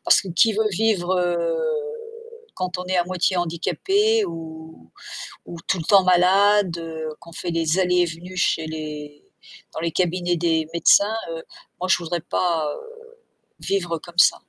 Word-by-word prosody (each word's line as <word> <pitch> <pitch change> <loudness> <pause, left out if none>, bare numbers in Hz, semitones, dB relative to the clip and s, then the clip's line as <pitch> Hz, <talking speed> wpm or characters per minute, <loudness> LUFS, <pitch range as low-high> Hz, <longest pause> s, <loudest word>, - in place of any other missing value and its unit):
Parce - - +6
que 195 - -8
qui 220 +6 +3
veut 220 +1 +1
vivre, 190 -3 +1
heu, 170 -2 0 1.0
quand 185 0 -3
on 180 - -4
est 185 0 0
à 175 - +2
moitié 185 +1 0
handicapé 400 - +1
ou 160 - -10 0.5
ou 170 - -8
tout - - +1
le - - -4
temps 195 -2 +6
malade, 185 0 +4 0.4
qu'on 170 - -13
fait 175 0 -4
des 165 +1 +1
allées 180 -1 +2
et - - +3
venues 175 +3 -8
chez 165 -2 +1
les 150 -2 -7 0.5
dans - - -5
les 165 0 -1
cabinets 175 0 0
des 160 -2 +1
médecins, 200 +6 +4 0.2
heu, 165 0 -6 0.4
moi 185 - -2
je - - +5
voudrais 170 0 -3
pas 165 -3 -1 0.9
vivre 175 -4 -1
comme 175 +1 -14
ça. - - +5
175 Hz, 160 wpm, -22 LUFS, 165-185 Hz, 1.0 s, Parce